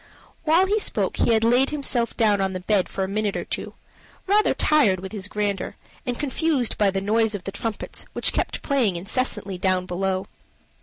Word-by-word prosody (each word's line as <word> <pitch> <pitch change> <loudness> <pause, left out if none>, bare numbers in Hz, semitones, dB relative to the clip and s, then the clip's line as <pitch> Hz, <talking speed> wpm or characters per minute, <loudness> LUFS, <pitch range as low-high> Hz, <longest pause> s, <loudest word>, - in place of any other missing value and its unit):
While 330 +4 +5
he 415 +3 +1
spoke - - -1
he 235 - +3
had 220 0 +3
laid 245 +4 +4
himself 270 -5 -1
down 210 -3 +3
on 190 0 0
the 185 - -3
bed 195 0 +1
for 190 - -2
a - - -1
minute 205 +1 -1
or - - -4
two, - - -5 0.5
rather 415 +2 +3
tired 260 -12 +3
with 190 +1 -7
his 205 -3 -4
grandeur, 205 -1 -2 0.3
and 245 -1 -1
confused 290 -3 0
by 205 -2 +3
the 195 0 -1
noise 220 +2 +1
of 190 - -6
the 195 - -4
trumpets 215 +2 -4
which - - +1
kept - - -2
playing 255 - +1
incessantly 200 0 -2
down 185 -1 +1
below. 185 +1 -1
210 Hz, 195 wpm, -24 LUFS, 195-255 Hz, 0.5 s, While